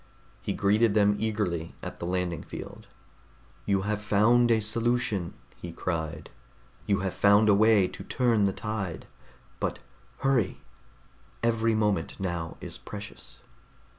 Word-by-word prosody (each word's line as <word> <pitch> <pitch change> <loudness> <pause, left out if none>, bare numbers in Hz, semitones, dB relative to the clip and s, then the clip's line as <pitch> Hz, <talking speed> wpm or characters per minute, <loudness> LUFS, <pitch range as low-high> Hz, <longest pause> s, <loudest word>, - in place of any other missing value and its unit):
He - - -2
greeted 105 +2 +3
them 105 -1 +4
eagerly 105 -7 -2
at - - -7
the 85 - -4
landing 90 -2 -1
field. - - -9 0.8
"You 100 -1 +2
have 105 0 -1
found 110 +4 +4
a 115 -1 +4
solution!" 110 -4 -1 0.2
he 85 - -7
cried. 80 -2 -4 0.6
"You 100 -2 +2
have 95 -2 -2
found 100 +2 +5
a - - +7
way 105 -2 +5
to - - -9
turn 115 -5 +2
the 100 - +2
tide 100 -4 -4 0.5
but - - -1 0.4
hurry! 130 -8 +1 0.8
Every 115 -1 +2
moment 105 -2 0
now 85 -4 -3
is - - -8
precious." 105 0 -10
105 Hz, 135 wpm, -28 LUFS, 95-110 Hz, 0.8 s, a